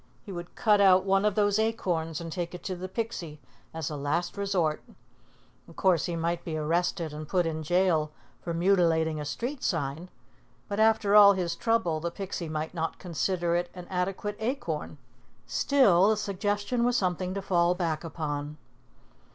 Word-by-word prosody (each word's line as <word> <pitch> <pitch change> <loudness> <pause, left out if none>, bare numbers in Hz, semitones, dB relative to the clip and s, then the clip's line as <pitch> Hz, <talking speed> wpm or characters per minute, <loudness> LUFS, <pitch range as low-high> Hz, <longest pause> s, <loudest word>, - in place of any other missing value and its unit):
He 200 - -9
would 175 -1 -8
cut 210 -3 +3
out 190 -1 +6
one 195 +1 +2
of 210 -2 +2
those 205 0 +2
acorns 175 -8 -1
and 165 -1 -6
take 175 +1 -4
it 180 - -10
to 185 - -3
the 185 +1 -6
Pixie 185 -8 -4 0.3
as 160 -2 -4
a - - -4
last 150 +5 -2
resort. 190 -6 0 0.9
Of 165 - -15
course, 180 -5 +2
he 170 - -2
might 170 +1 -2
be 160 -2 -4
arrested 165 0 -1
and 150 0 -7
put 180 -2 +2
in 160 -1 -2
jail 165 -2 +2 0.3
for 170 - -4
mutilating 165 -3 +2
a - - -5
street 245 - -4
sign; 160 +1 -2 0.6
and 205 +2 0
after 220 -2 +3
all 200 -1 +9
his 175 -3 -2
trouble, 225 -9 0
the 170 +2 -2
Pixie 180 -2 -5
might 155 +1 -3
not 165 -2 -3
consider 175 0 -1
it 175 0 -1
an 180 -1 -8
adequate 195 +3 -2
acorn; 255 +6 -3 0.5
still 210 -9 +4
the 220 - +2
suggestion 205 +3 -1
was 245 0 +2
something 185 -1 -1
to 200 - -2
fall 175 -2 +2
back 165 -3 -2
upon. 150 -2 -4
175 Hz, 175 wpm, -28 LUFS, 165-200 Hz, 0.9 s, all